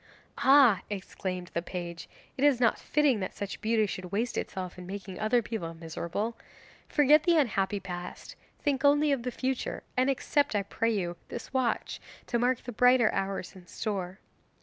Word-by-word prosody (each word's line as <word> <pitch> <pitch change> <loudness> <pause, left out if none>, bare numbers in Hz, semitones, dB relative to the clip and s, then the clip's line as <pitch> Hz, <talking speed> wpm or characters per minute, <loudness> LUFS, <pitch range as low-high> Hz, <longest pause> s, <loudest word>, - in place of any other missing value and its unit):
'Ah,' 265 -7 +6
exclaimed 185 -2 -5
the 170 - 0
page, 175 -1 -6 0.3
'it 265 - -2
is 285 -4 +5
not 235 -2 +3
fitting 290 -6 +2
that 185 - -4
such 200 -1 -5
beauty 220 0 +2
should 185 -2 -6
waste 225 +4 -1
itself 185 -2 -4
in 180 - -9
making 195 -1 -7
other 230 +2 +2
people 175 -7 -4
miserable. 170 +7 -4 0.5
Forget 295 +1 +5
the 340 0 +3
unhappy 205 -8 +1
past 180 -2 -7 0.2
and - - -33
think 275 -1 0
only 290 +1 +4
of 275 -3 +1
the 250 - -2
future. 260 +1 -3
And 255 +2 +3
accept, 280 -1 +1
I 200 - +1
pray 230 +3 -1
you, 175 -6 -1
this 240 - -8
watch, 260 -2 -1 0.2
to 235 - 0
mark 250 +1 +1
the 245 - -6
brighter 250 -1 +5
hours 195 -1 -3
in 180 -2 -14
store. 190 -4 -4
215 Hz, 175 wpm, -29 LUFS, 185-255 Hz, 0.5 s, Ah